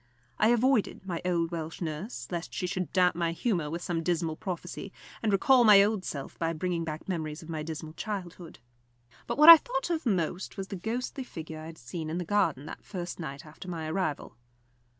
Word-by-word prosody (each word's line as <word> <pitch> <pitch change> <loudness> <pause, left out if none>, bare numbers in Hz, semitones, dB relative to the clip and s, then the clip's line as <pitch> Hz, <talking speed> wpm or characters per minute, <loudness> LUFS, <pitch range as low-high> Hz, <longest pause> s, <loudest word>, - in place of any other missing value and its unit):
I 215 - +5
avoided 240 -4 +2
my 175 -3 -3
old 170 -2 0
Welsh 165 -1 -5
nurse, 165 +7 -5
lest 170 -1 -4
she 185 - -1
should 180 0 -3
damp 180 -1 +4
my 170 -1 0
humour 170 -5 -1
with 170 +3 -4
some 170 -2 -1
dismal 165 -2 0
prophecy, 180 +1 -6 0.3
and 220 - +1
recall 245 +6 +5
my 205 -3 +8
old 205 -2 0
self 140 -2 -6
by 165 0 0
bringing 170 +1 -2
back 155 -1 -6
memories 160 -4 -3
of 160 - -13
my 160 -2 -3
dismal 155 0 -6
childhood. 180 -4 -6 0.7
But - - -2
what 300 +3 +9
I 335 - +15
thought 270 +1 -3
of 320 -5 -1
most 185 -1 -1
was 195 -1 -5
the - - -4
ghostly 240 +8 -3
figure 160 -8 -8
I 155 - -8
had 165 0 -10
seen 155 +6 -6
in 165 - -2
the 180 - -3
garden 165 -8 +1
that - - -9
first 175 -3 -6
night 140 -3 -6
after 155 +4 -11
my 165 -3 -4
arrival. 155 -7 -2
175 Hz, 205 wpm, -29 LUFS, 160-200 Hz, 0.7 s, I